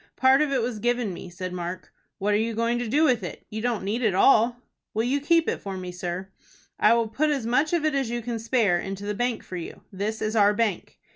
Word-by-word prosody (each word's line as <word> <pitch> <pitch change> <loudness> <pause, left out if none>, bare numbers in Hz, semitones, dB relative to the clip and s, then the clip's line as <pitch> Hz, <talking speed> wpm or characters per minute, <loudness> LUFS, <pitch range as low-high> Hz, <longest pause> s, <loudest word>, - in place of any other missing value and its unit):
"Part 265 +2 +5
of 300 -2 +1
it 260 -4 +1
was 235 -2 -3
given 240 -3 0
me," 180 - -8
said 180 +1 -6
Mark. 175 +1 -6 0.2
"What 205 +2 0
are - - +4
you 225 +1 -1
going 230 +1 0
to 240 - -3
do 290 +8 +2
with 255 -7 +3
it? 180 - -7
You 220 +1 -4
don't 235 -4 -1
need 215 +5 -1
it 215 -6 +2
all?" 235 +3 +5 0.4
"Will 220 - +1
you 270 +4 0
keep 330 +2 +3
it - - -1
for 195 -1 -5
me, 180 -1 -6
sir?" 180 +1 -5 0.5
"I - - +5
will 230 -1 +1
put 285 +8 0
as 275 -6 -1
much 265 +6 +2
of 340 -3 +1
it 310 - +2
as 270 -4 0
you 240 0 -3
can 235 -1 -3
spare 220 -6 +2
into 195 +2 -5
the 210 - -1
bank 245 +2 -1
for 185 - -7
you. 170 - -8
This 210 +3 -3
is 215 +1 -1
our 205 -1 +4
bank." 215 -4 -1
225 Hz, 260 wpm, -25 LUFS, 195-245 Hz, 0.5 s, Part